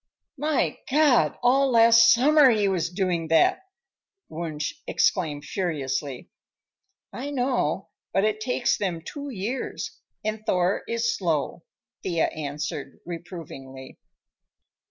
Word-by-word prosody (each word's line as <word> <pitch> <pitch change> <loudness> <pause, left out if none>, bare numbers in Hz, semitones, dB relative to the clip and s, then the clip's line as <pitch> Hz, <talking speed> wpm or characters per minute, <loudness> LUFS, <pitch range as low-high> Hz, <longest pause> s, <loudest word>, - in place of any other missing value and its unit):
"My 300 0 0
God! 290 -2 +3
all 270 +3 +4
last 230 -1 +7
summer 285 +3 +6
he 215 -4 +2
was 180 -4 0
doing 180 -3 -1
that!" 165 - +4 0.7
Wunsch 155 -2 -4
exclaimed 150 -6 0
furiously. 145 -7 -3 0.8
"I 270 +4 -5
know, 260 -2 -1 0.2
but 195 +2 +2
it 215 0 0
takes 245 +1 0
them 175 -5 -2
two 285 - -6
years, 235 +3 -4 0.3
and 215 0 -3
Thor 180 -1 +1
is 230 0 0
slow," 165 -2 -2 0.4
Thea 170 -3 0
answered 150 -1 -5
reprovingly. 160 -7 -9
190 Hz, 110 wpm, -25 LUFS, 160-245 Hz, 0.8 s, last